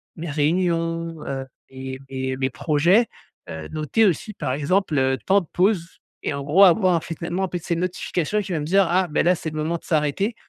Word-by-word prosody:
mes 170 0 -6
réunions, 165 +1 0
heu, 135 -1 -3 0.2
et 130 0 -7
et 130 -1 -3
mes 130 0 0
projets, 170 - +2 0.4
heu, 80 -1 -6
noter 155 +9 +1
aussi 205 +3 0
par, 130 - -3
exemple 155 +3 0
heu, 130 0 +2
temps 200 +1 +4
de 175 - -12
pause, 180 -2 0 0.2
et - - -1
en 140 - -4
gros 155 +8 +5
avoir 180 -2 +4
finalement 170 +3 -3
après 180 -1 -2
ces 170 +1 -2
notifications 180 +2 -1
qui 190 - -7
va 160 - 0
me - - -3
dire: 195 +3 +3
«Ah 185 +1 +2
beh, 150 - +1
là 180 +1 +4
c'est 160 - -5
le 155 - -6
moment 160 +3 -1
de - - -21
s'arrêter 160 +8 0
165 Hz, 205 wpm, -23 LUFS, 145-185 Hz, 0.4 s, gros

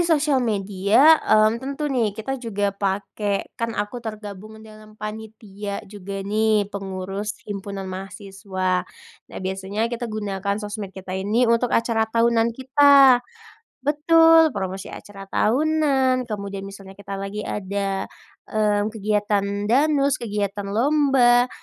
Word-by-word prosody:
di - - +3
sosial 300 -4 +2
media, 210 +6 +4
mmm, 215 +1 +3
tentu 280 +3 -4
nih 230 -6 0
kita 270 +5 -4
juga 205 -4 -1
pake 200 +1 -2
kan 230 -1 -2
aku 210 +4 -3
tergabung 215 -1 -8
dalam 215 0 -15
panitia 210 -1 -7
juga 200 -1 -7
nih, 210 0 +1
pengurus 195 +1 -4
himpunan 200 -1 -5
mahasiswa. 190 -1 -3 0.5
Nah, - - -7
biasanya 195 +4 -2
kita 240 0 -3
gunakan 200 -2 -3
sosmed 205 -2 -6
kita 190 -1 -8
ini 210 +6 +1
untuk 235 +1 +2
acara 230 -1 +1
tahunan 230 0 +2
kita 270 0 +6 0.7
betul, 325 +1 +5
promosi 190 -3 -5
acara 195 -1 -10
tahunan, 265 -1 +2
kemudian 200 -2 -5
misalnya 195 -1 -11
kita 200 -1 -7
lagi 195 +1 -5
ada, 195 -1 -2 0.5
mmm, 210 0 +1
kegiatan 210 -1 0 0.2
danus, 280 +2 +2
kegiatan 205 -2 -3
lomba, 245 +1 +3
215 Hz, 120 wpm, -22 LUFS, 200-245 Hz, 0.7 s, kita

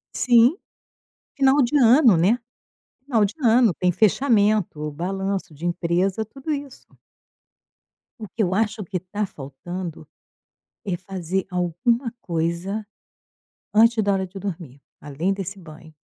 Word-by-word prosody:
Sim, 240 +3 +5 0.8
final 275 +1 +4
de 250 +5 +1
ano, 245 - +6
né? 190 +9 +3 0.7
Final 230 -7 +2
de 200 - -4
ano, 235 -3 +4
tem 180 +2 +1
fechamento, 210 - +2
balanço 190 +2 -3
de 155 +4 -8
empresa, 175 +4 0
tudo 270 +8 -7
isso. 280 -2 -7 1.3
O 215 - -7
que 220 - -4
eu 185 -1 0
acho 220 +1 -1
que 180 0 -4
tá 205 +4 -4
faltando 170 +3 -8 0.8
é 190 -4 -2
fazer 185 0 -4
alguma 180 - 0
coisa, 170 +5 -2 0.9
antes 225 +1 +4
da 200 - +1
hora 190 -1 -1
de 190 +2 -10
dormir, 165 -8 -7 0.2
além 150 +6 -2
desse 195 0 -6
banho. 160 -2 -14
195 Hz, 125 wpm, -23 LUFS, 175-225 Hz, 1.3 s, ano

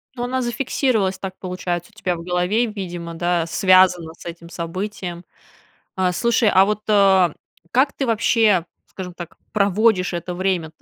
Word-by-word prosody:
Ну, 245 - -4
она 255 +1 -1
зафиксировалась, 240 -5 0
так 190 -1 -6
получается, 180 0 -4
у 210 - -27
тебя 180 -4 -1
в 170 - -8
голове, 180 +6 +1
видимо, 175 -6 -6
да, 175 0 0
связано 180 -2 +3
с - - -15
этим 170 0 -8
событием. 180 +1 -5 0.7
А 185 -1 +1
слушай, 235 +1 +2
а 190 0 +5
вот, 210 0 -1
э, 195 -4 +5 0.4
как 265 +3 +3
ты 275 - -2
вообще, 220 -5 +3 0.2
скажем 180 -2 -8
так, 175 -1 -10
проводишь 200 -2 +2
это 175 +1 -4
время-то: 175 -4 -2
185 Hz, 155 wpm, -21 LUFS, 175-215 Hz, 0.7 s, а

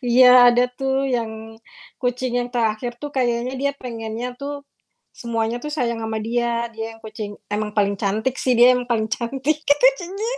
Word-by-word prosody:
Iya, 250 0 +7
ada 245 +1 +4
tuh 270 +1 -1
yang 225 -3 -4 0.4
kucing 245 0 -1
yang 245 - -3
terakhir 240 0 -1
tuh 290 +3 -7
kayaknya 245 -1 0
dia 280 0 +1
pengennya 230 -1 -5
tuh 285 0 -6 0.5
semuanya 230 0 -2
tuh 300 - -5
sayang 245 -6 -2
sama 220 0 -3
dia. 235 0 -1
Dia 225 0 -6
yang - - -22
kucing 210 -1 -7 0.2
emang 210 0 -3
paling 200 -1 +3
cantik 220 +6 -1
sih, 255 -2 +2
dia 245 +2 +7
yang 250 0 -2
paling 220 -2 0
cantik, 270 +6 -1
gitu 290 +13 +5
jadi 380 +4 -5
240 Hz, 175 wpm, -21 LUFS, 225-255 Hz, 0.5 s, Iya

